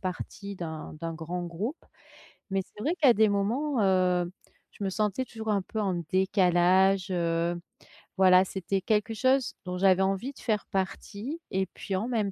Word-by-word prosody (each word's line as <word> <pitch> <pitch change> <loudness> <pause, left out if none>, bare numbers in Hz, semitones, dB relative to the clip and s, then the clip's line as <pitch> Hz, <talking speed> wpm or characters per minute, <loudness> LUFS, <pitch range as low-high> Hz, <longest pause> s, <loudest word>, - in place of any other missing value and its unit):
partie 200 +1 -5
d'un, 160 -3 -6
d'un 165 -1 -3
grand 175 +2 -4
groupe. 200 - -5 0.7
Mais, 195 0 0
c'est 210 - -13
vrai 315 - +1
qu'à 265 -5 +7
des 220 0 +4
moments, 235 +7 0
heu, 180 -2 +2 0.4
je - - -8
me - - +1
sentais 210 +5 -1
toujours 220 -3 -7
un 205 -2 +2
peu 220 +4 -4
en 195 -3 0 0.2
décalage, 190 0 +3
heu. 170 0 0 0.6
Voilà, 185 0 +6
c'était 190 +1 -2
quelque 210 +3 +1
chose 260 +3 +2
dont 180 0 -3
j'avais 190 0 +4
envie 195 +8 0
de - - -16
faire 215 -3 -1
partie 200 - -3
et 190 -1 0
puis 195 +1 -5
en 200 +5 -1
même 220 -5 0
195 Hz, 170 wpm, -28 LUFS, 180-215 Hz, 0.7 s, qu'à